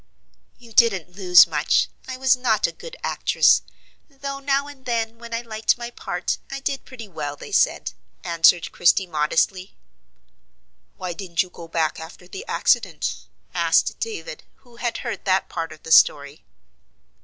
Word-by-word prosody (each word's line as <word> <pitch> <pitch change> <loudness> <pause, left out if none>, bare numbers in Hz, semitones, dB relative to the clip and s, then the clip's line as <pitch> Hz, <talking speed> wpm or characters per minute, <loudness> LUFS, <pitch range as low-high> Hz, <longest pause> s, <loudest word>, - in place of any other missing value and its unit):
"You 235 -2 -16
didn't 195 -7 +3
lose 180 -3 +7
much: 155 -1 +1 0.2
I 260 -1 -5
was 260 -1 +4
not 235 -4 +1
a - - -1
good - - -11
actress; - - +3 0.5
though 275 0 -6
now 275 0 0
and 280 -2 -13
then 230 -1 -2
when 235 0 -11
I 230 0 -2
liked 220 -1 0
my 240 0 -6
part - - -3
I 275 - -5
did 275 0 -3
pretty 240 -5 -10
well 150 -5 -5
they - - -11
said," - - +2 0.3
answered 170 0 +3
Christie, 175 +2 +3
modestly. 175 +4 -1 1.2
"Why 180 -1 -4
didn't 170 -1 -1
you 180 - -16
go 170 - -11
back 160 -1 -1
after 165 +2 -11
the 390 - -8
accident?" 160 - 0 0.3
asked 165 -1 +2
David, 455 +2 -5
who 240 -2 -21
had 240 -1 -2
heard - - -4
that 190 -1 +1
part 165 0 -4
of 155 - -13
the 160 - -8
story. 145 -2 +4
195 Hz, 160 wpm, -22 LUFS, 165-245 Hz, 1.2 s, lose